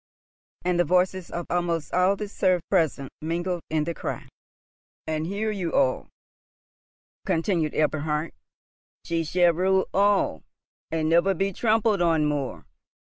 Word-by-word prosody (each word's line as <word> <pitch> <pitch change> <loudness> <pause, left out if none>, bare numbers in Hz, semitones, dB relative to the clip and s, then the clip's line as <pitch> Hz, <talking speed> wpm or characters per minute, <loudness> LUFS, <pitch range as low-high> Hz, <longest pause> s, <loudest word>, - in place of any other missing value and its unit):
And 180 -1 +1
the - - +5
voices 180 +2 +1
of 175 -1 -4
almost 170 -2 -1
all 185 +2 +3
the 210 +1 -5
serfs 185 -4 +1
present 160 -7 +1
mingled 175 +2 -2
in 155 -1 +1
the 170 +2 -3
cry. - - -5 0.8
"And 155 0 -2
hear 210 +3 -2
you 185 -5 -3
all," 130 - +1 1.2
continued 165 -2 0
Eberhard, 155 +1 0 0.7
"she 165 -1 -1
shall 175 +2 +3
rule 190 +2 +2
all, 200 - +2 0.5
and 160 -1 -1
never 170 +4 +3
be 195 +2 -1
trampled 220 -2 +2
on 165 -3 +3
more. 145 -3 -2
175 Hz, 135 wpm, -25 LUFS, 160-190 Hz, 1.2 s, the